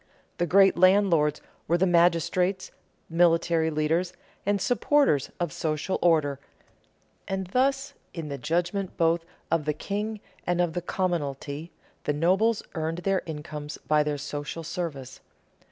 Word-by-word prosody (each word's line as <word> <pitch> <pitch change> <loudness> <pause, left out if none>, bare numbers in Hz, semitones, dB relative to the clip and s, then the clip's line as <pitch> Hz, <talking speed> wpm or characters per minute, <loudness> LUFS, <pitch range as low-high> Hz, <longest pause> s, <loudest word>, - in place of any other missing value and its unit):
The 175 - +1
great 195 +2 +5
landlords 185 -6 +4 0.3
were 170 - +3
the 185 - +3
magistrates, 180 +2 +2 0.4
military 165 -1 +3
leaders, 160 +4 0 0.3
and 205 0 +2
supporters 245 - +2
of 175 -4 -2
social 155 +4 -2
order, 155 -5 +3 0.9
and 190 0 -2
thus, 270 +7 0 0.2
in 165 -3 -6
the 140 -1 -5
judgment 175 - -1
both 165 0 +2 0.3
of 165 -3 +1
the 150 - +1
king 210 +6 -3 0.3
and 175 0 +1
of 175 -2 +1
the 175 - -2
commonalty, 155 -4 -3 0.4
the 145 - +1
nobles 190 +9 +2
earned 160 0 -2
their 195 -1 +1
incomes 150 -1 -6
by 150 0 +4
their 150 -1 -1
social 145 +3 -5
service. 145 -6 -5
170 Hz, 135 wpm, -27 LUFS, 150-185 Hz, 0.9 s, great